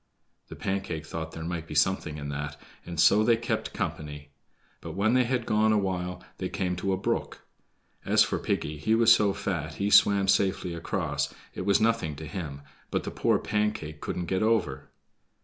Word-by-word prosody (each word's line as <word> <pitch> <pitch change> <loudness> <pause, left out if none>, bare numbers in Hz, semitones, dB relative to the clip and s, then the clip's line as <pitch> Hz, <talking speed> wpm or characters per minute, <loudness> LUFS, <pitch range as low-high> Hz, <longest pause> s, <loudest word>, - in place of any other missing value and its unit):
The - - -9
Pancake 95 -5 -3
thought 80 0 -5
there 80 - -6
might 85 -1 -4
be 75 - -7
something 75 -1 +1
in 70 -1 -5
that, 75 0 -5 0.3
and 85 -2 -5
so 105 +5 +6
they 115 0 +4
kept 120 - -2
company. 75 -1 -5 0.5
But - - -7
when 105 +4 +2
they 130 -1 +4
had 125 -1 -1
gone 110 +1 +3
awhile, 95 -3 -1 0.2
they - - -2
came 90 -1 -1
to 95 +2 -1
a 95 - +1
brook. 95 - -2 0.6
As - - +5
for - - -2
Piggy, 75 +1 -2
he 110 +8 +2
was 115 0 +7
so 105 -2 +3
fat 80 -6 -3
he 100 +1 -1
swam 100 -1 +6
safely 95 -2 +2
across, 75 -4 -2 0.2
it 90 - -5
was 100 - +4
nothing 110 -9 +1
to 80 +2 -8
him; 75 -4 -6 0.3
but - - -1
the - - -5
poor - - +2
Pancake 105 -8 -2
couldn't 90 - -3
get 95 +1 -1
over. 110 -11 0
95 Hz, 185 wpm, -28 LUFS, 75-105 Hz, 0.6 s, was